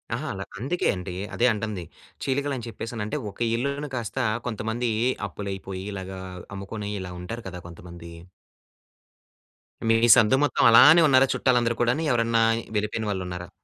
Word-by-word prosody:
అహా! 155 +6 -4
అల 95 - -5 0.2
అందుకే 145 +10 -2
అండి. 90 0 -6 0.2
అదే 120 - +1
అంటంది. 105 -4 -4 0.4
చీలికలని 135 -2 -2
చెప్పేసనంటే 115 +1 -5
ఒక - - -22 0.2
ఇళ్లును 140 +4 -2
కాస్తా 120 +2 -3 0.2
కొంతమందీ 115 +1 -2 0.4
అప్పులయిపోయి 95 -1 -6
ఇలాగా 95 -1 -6 0.4
అమ్ముకొనీ 100 +1 -6
ఇలా 90 -1 -7
ఉంటారు 115 +6 -6
కదా 90 -1 -8
కొంతమంది. 85 0 -11 1.8
మీ 115 - +4 0.2
సందు 110 +4 +4
మొత్తం 145 - +1
అలానే 145 +9 +8
ఉన్నారా 135 -1 +5
చుట్టాలందరు 120 -3 +1
కూడాని? 120 +7 +1
ఎవరన్నా 115 -1 +2 0.3
వెళ్ళిపోయిన 105 +1 -1
వాళ్ళున్నారా? 90 -2 -4
115 Hz, 130 wpm, -25 LUFS, 95-125 Hz, 1.8 s, అలానే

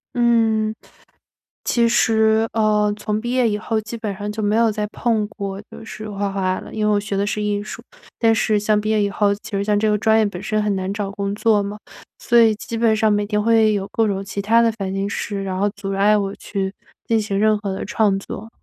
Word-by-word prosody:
嗯， 225 -3 +2 0.9
其 235 -1 +2
实， 220 -1 +3
呃， 210 -1 +2
从 210 0 -2
毕 240 +2 -4
业 250 -2 +2
以 210 - 0
后， 220 +1 -2
基 225 +2 -7
本 220 -3 -4
上 205 +1 -4
就 215 +1 -4
没 210 +1 +1
有 230 -1 +3
再 210 0 -2
碰 220 -1 0
过 200 -2 -6
就 - - -11
是 215 -1 -8
画 200 -1 -2
画 185 -1 -1
了。 - - -10
因 215 - -1
为 210 - +3
我 205 - +3
学 205 -1 -3
的 200 - +1
是 210 +1 -2
艺 205 -1 -1
术， 215 - -8 0.4
但 225 -1 +4
是 215 -1 +1
像 210 0 +2
毕 215 - -2
业 215 -1 +2
以 205 - +1
后， 200 0 +1
其 215 +2 -12
实 200 0 0
像 210 0 +1
这 215 +1 +1
个 210 - +3
专 220 +1 +3
业 220 - +3
本 190 -2 -6
身 215 +2 0
很 210 -1 0
难 190 0 -2
找 205 -1 -3
工 200 0 -3
作 215 -1 +3
嘛， 205 +1 -6 0.4
所 240 - 0
以 225 -1 +5
基 230 +1 -6
本 225 -1 +3
上 215 -1 +3
每 205 0 +1
天 210 0 -1
会 220 0 +4
有 200 -1 -2
各 225 -1 +2
种 195 -1 -2
其 200 +1 -4
他 225 +3 +4
的 230 -1 +3
烦 195 -4 -4
心 195 +1 -2
事， 200 -1 -4
然 185 -1 -3
后 205 +2 +1
阻 195 -1 -4
碍 200 +2 +3
我 195 0 -2
去 195 -2 -4 0.3
进 225 -1 +2
行 200 -2 -2
任 215 +1 +3
何 200 -2 -4
的 190 - -4
创 205 -2 +1
作。 220 +3 -8
210 Hz, 265 characters per minute, -20 LUFS, 200-220 Hz, 0.9 s, 以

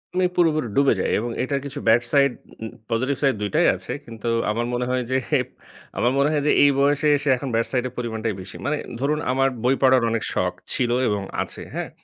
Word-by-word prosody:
আমি 185 - +2
পুরোপুরি 155 -7 +2
ডুবে 140 -2 +4
যাই - - 0
এবং 120 +2 -3
এটার 140 +1 -1
কিছু 140 - -5
ব্যাড 115 +2 +5
সাইড, 140 -2 +4 0.3
উম 110 - -4 0.2
পজিটিভ 130 +5 0
সাইড 135 -4 +2
দুইটাই 105 -2 +2
আছে। - - -7
কিন্তু 115 -1 -8 0.2
আমার 120 +2 -1
মনে 125 0 -1
হয় 125 -1 0
যে, 130 - +3 0.8
আমার 120 - +2
মনে 140 +2 +3
হয় 145 -2 0
যে - - +5
এই 145 - +6
বয়সে 145 +2 +2
এসে 145 0 -2
এখন 135 0 -5
ব্যাড 115 0 +1
সাইড 125 -2 0
এর 125 - -10
পরিমাণটাই 115 -2 -2
বেশি। 95 - -10
মানে 150 +1 0 0.2
ধরুন 150 +3 0
আমার 135 +1 +2
বই 130 +2 +3
পড়ার 130 -2 +5
অনেক 115 -1 -1
শখ 90 -1 0 0.2
ছিল 120 -2 0 0.2
এবং 105 -1 0 0.2
আছে। - - -5
হ্যাঁ? - - -4
130 Hz, 215 wpm, -23 LUFS, 115-140 Hz, 0.8 s, এই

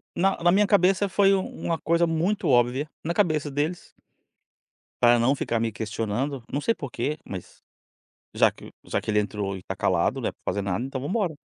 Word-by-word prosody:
na 195 +2 +2
na 175 - +5
minha 200 +2 +4
cabeça 195 0 +3
foi 195 0 +4
uma 185 -3 -2
coisa 170 +1 +2
muito 170 +5 0
óbvia, 125 +3 +3 0.2
na 170 - -1
cabeça 155 -7 +1
deles 150 +5 -3 1.1
Para 120 0 +6
não 120 +4 +3
ficar 120 -4 -1
me 115 -1 0
questionando, 115 +5 -3
não 140 - -1
sei 230 +10 +1
porque 140 +2 -3
mas, 95 -3 -9 0.7
já - - +5
que - - -13 0.2
já - - -1
que - - -7
ele 105 0 +3
entrou 105 -2 -2
e - - -7
está 90 - -6
calado - - +1
né - - 0
para - - -34
fazer 100 - -1
nada 100 +5 -2
então 135 -1 -5
vamos 140 - -4
embora. 195 -8 0
145 Hz, 195 wpm, -25 LUFS, 115-175 Hz, 1.1 s, Para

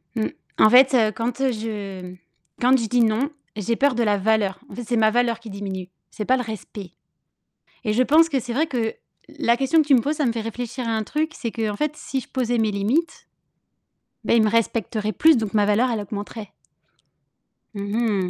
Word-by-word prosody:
Mmh. 220 - 0 0.3
En 215 - +6
fait, 255 +3 +6
heu, 220 -4 +4
quand, 235 +5 -3
heu, 265 - +2
je 200 -5 -6 0.5
quand 250 +1 +3
je 230 -3 -2
dis: 245 +2 +2
«Non», 230 +5 +1 0.3
j'ai 215 +2 -1
peur 280 +1 +2
de 235 - +1
la 205 -2 +2
valeur. 205 -1 +1
En - - -10
fait, 245 - -5
c'est 235 +1 -1
ma 220 -1 +4
valeur 235 -1 +1
qui 230 -1 -11
diminue. 195 -2 -6 0.2
C'est 210 - -5
pas 260 +3 +3
le 250 - -2
respect. 210 -4 -8 0.9
Et 215 - 0
je 250 +4 +3
pense 320 +5 +5
que 275 -4 0
c'est 240 0 -6
vrai 300 +6 +1
que 240 -7 -2 0.4
la 235 - +3
question 270 +5 +3
que 300 - -8
tu 280 - +5
me 245 - +5
poses, 295 +6 -2
ça 295 -3 0
me 235 - +1
fait 230 - -3
réfléchir 235 +2 -5
à 225 - 0
un 220 -1 -1
truc. 310 +7 -2
C'est 230 -3 -5
qu'en 215 -3 -2
fait, 300 +3 -1
si 270 - -4
je - - -14
posais 245 -2 -1
mes 220 -1 +2
limites, 225 +12 -1 1.0
beh, 235 - +3
ils 220 - +5
me 215 - +2
respecteraient 220 -1 0
plus, 320 +2 +5
donc 220 -3 -2
ma 205 -1 +3
valeur, 225 +5 +2
elle 225 - -1
augmenterait. 205 +1 -7 1.2
Mmh 200 - -6
mh. 205 -3 0
230 Hz, 220 wpm, -23 LUFS, 210-250 Hz, 1.2 s, En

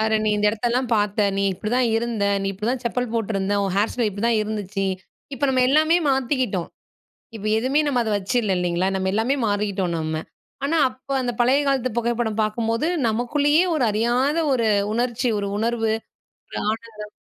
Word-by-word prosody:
"பாரேன் 220 0 +1
நீ 215 - +2
இந்த 210 0 +2
இடத்தெல்லாம் 240 +4 -1
பாத்த, 205 0 +1
நீ 200 - +1
இப்படிதான் 240 +7 0
இருந்த. 230 -2 -1 0.2
நீ - - -2
இப்படிதான் 225 +6 -2
செப்பல் 245 +1 -1
போட்டிருந்த. 205 -3 -1
உன் 195 - -2
ஹேர் 205 +3 +2
ஸ்டைல் 240 -3 0
இப்படி 200 +3 -5
தான் 235 -2 +2
இருந்துச்சு" 205 -2 -3 0.5
இப்போ 270 - -2
நம்ம 260 -1 +3
எல்லாமே 310 +4 +4
மாத்திக்கிட்டோம். 255 - 0 0.7
இப்போ 215 -1 -6
எதுவுமே 260 +6 +2
நம்ம 270 -4 +1
அத 220 - -2
வச்சுல்ல 205 +1 0
இல்லீங்களா? 180 +1 0
நம்ம 190 0 -1
எல்லாமே 225 +6 +1
மாறிகிட்டோம் 200 -3 -1
நம்ம. 160 0 -3 0.5
ஆனா 310 +4 +1
அப்ப 255 +1 -19
அந்த 245 -1 -1
பழைய 255 +4 +4
காலத்து 260 -2 +1
புகைப்படம் 235 -2 -1
பாக்கும்போது, 230 +6 -1 0.2
நமக்குள்ளயே 290 +8 +2
ஒரு 290 -5 +1
அறியாத 240 +7 +1 0.2
ஒரு 230 -4 +1 0.3
உணர்ச்சி, 240 +1 0
ஒரு 200 - -3
உணர்வு, 225 0 0 0.6
ஒரு - - -4
ஆனந்தம் 220 -2 -7
225 Hz, 165 wpm, -22 LUFS, 210-250 Hz, 0.7 s, எல்லாமே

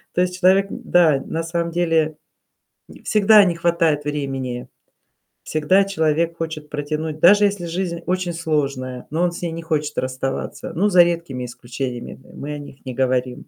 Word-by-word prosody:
То 180 - +3
есть 180 0 -1
человек 195 +2 +4
н - - -7
да, 155 -6 +4
на 165 +1 -3
самом 170 0 -2
деле 165 -3 +1 0.7
н - - -14
всегда 215 0 +6
не 175 - +1
хватает 165 -3 +1
времени, 135 -4 -3 0.8
всегда 155 +6 +2
человек 165 -3 0
хочет 160 -2 -5
протянуть, 150 +1 -3
даже 205 +5 +6
если 200 -3 -1
жизнь 170 0 -3
очень 185 -1 -1
сложная, 140 -6 -2
но 160 +3 -1
он 175 - +2
с 180 - -8
ней 170 -2 -2
не 165 +1 -5
хочет 150 -2 -2
расставаться. 130 +1 -3
Ну, 200 +5 +2
за 180 -3 +7
редкими 170 -7 -2
исключениями, 120 +1 -6
м - - -14
мы 150 +1 -5
о - - -5
них 140 -1 -13
не 130 - -5
говорим. 125 -1 -1
160 Hz, 175 wpm, -21 LUFS, 140-175 Hz, 0.8 s, за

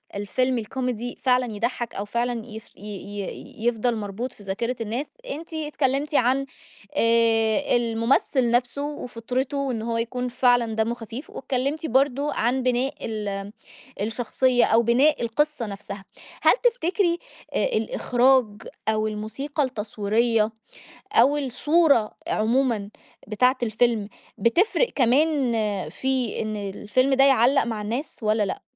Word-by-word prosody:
الفيلم 250 +5 0
الكوميدي 245 +1 -3
فعلًا 250 -3 +2
يضحّك، 235 +2 -2
أو 200 - -3
فعلًا 235 +1 -2
يفش 220 -1 -11
ي - - -21
ي 205 +2 -7
يفضل 240 0 +1
مربوط 215 +4 -4
في 205 - -15
ذاكرة 230 +6 -2
الناس، 235 +7 -2 0.3
أنتِ 325 +2 -7
اتكلمتِ 295 -1 -1
عن 265 +2 +3 0.5
آآ، 230 +2 +3
الممثل 235 +2 +1
نفسه 245 +3 +1
وفِطرته 255 -1 -3
وإن 260 -5 -1
هو 230 0 -2
يكون 250 +2 -2
فعلًا 245 -2 +2
دمّه 225 +1 +1
خفيف، 235 +5 -8
واتكلمتِ 275 +5 -2
برضه 275 +2 +1
عن 250 +3 0
بناء 255 +3 +1
ال 205 -2 -4 0.5
الشخصية 245 +3 +2
أو 230 +1 +4
بناء 260 +6 +3
القصّة 295 +2 0
نفسها، 200 -1 -8 0.4
هل - - +6
تفتكري 370 -7 +1 0.3
آآ، - - +1
الإخراج 265 - +2 0.4
أو 215 0 +1
الموسيقى 270 +8 -3
التصويرية 220 -1 0 0.6
أو 290 -7 +5
الصورة 280 -2 +2 0.2
عمومًا 225 -2 +1 0.4
بتاعة 250 +5 +2
الفيلم، 220 -2 +1 0.3
بتفرق 380 - +2
كمان 270 0 +3 0.4
في 260 -3 -1
إن 215 -1 -3
الفيلم 210 +6 0
ده 270 +1 +5
يعلّق 270 0 +5
مع 225 -3 -3
الناس 235 +8 -4
والَّا 215 0 +2
لأ؟ 195 - -3
240 Hz, 125 wpm, -24 LUFS, 220-270 Hz, 0.6 s, هل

